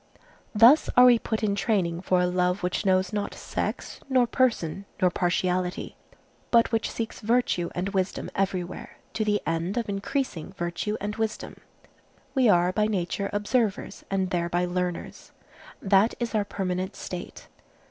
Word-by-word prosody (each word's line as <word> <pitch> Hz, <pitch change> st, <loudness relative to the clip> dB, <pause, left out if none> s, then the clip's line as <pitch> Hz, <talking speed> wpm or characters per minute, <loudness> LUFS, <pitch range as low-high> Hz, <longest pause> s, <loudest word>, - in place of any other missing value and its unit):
Thus 235 Hz, +8 st, +7 dB
are 250 Hz, -, +9 dB
we 245 Hz, -2 st, +6 dB
put 220 Hz, -1 st, -3 dB
in 205 Hz, -2 st, +2 dB
training 190 Hz, -5 st, 0 dB
for 185 Hz, -1 st, +2 dB
a -, -, +3 dB
love 180 Hz, +1 st, 0 dB
which 180 Hz, +3 st, -1 dB
knows 185 Hz, 0 st, +2 dB
not 205 Hz, -1 st, -2 dB
sex, -, -, -4 dB
nor 255 Hz, -2 st, +4 dB
person, 220 Hz, -7 st, 0 dB
nor 180 Hz, -1 st, +3 dB
partiality, 180 Hz, 0 st, -1 dB, 0.5 s
but 235 Hz, 0 st, +4 dB
which 225 Hz, -2 st, 0 dB
seeks 225 Hz, -1 st, -5 dB
virtue 225 Hz, -6 st, +1 dB
and 180 Hz, +2 st, -1 dB
wisdom 190 Hz, -1 st, -2 dB
everywhere, 185 Hz, -2 st, -3 dB, 0.2 s
to 220 Hz, -, 0 dB
the 210 Hz, -1 st, +1 dB
end 165 Hz, +6 st, -1 dB
of 235 Hz, -, -1 dB
increasing 200 Hz, -, -3 dB
virtue 175 Hz, +4 st, -3 dB
and 210 Hz, +2 st, -4 dB
wisdom. 220 Hz, -1 st, -3 dB, 0.8 s
We 260 Hz, -4 st, +4 dB
are 175 Hz, -2 st, +4 dB
by 210 Hz, +2 st, +1 dB
nature 200 Hz, 0 st, -2 dB
observers, 210 Hz, 0 st, -1 dB
and 190 Hz, -1 st, -1 dB
thereby 175 Hz, 0 st, 0 dB
learners. 180 Hz, -1 st, -4 dB, 0.5 s
That 200 Hz, +3 st, +3 dB
is 240 Hz, -2 st, -3 dB
our 210 Hz, -2 st, +1 dB
permanent 185 Hz, -2 st, -3 dB
state. 180 Hz, 0 st, -8 dB
195 Hz, 150 wpm, -26 LUFS, 180-220 Hz, 0.8 s, are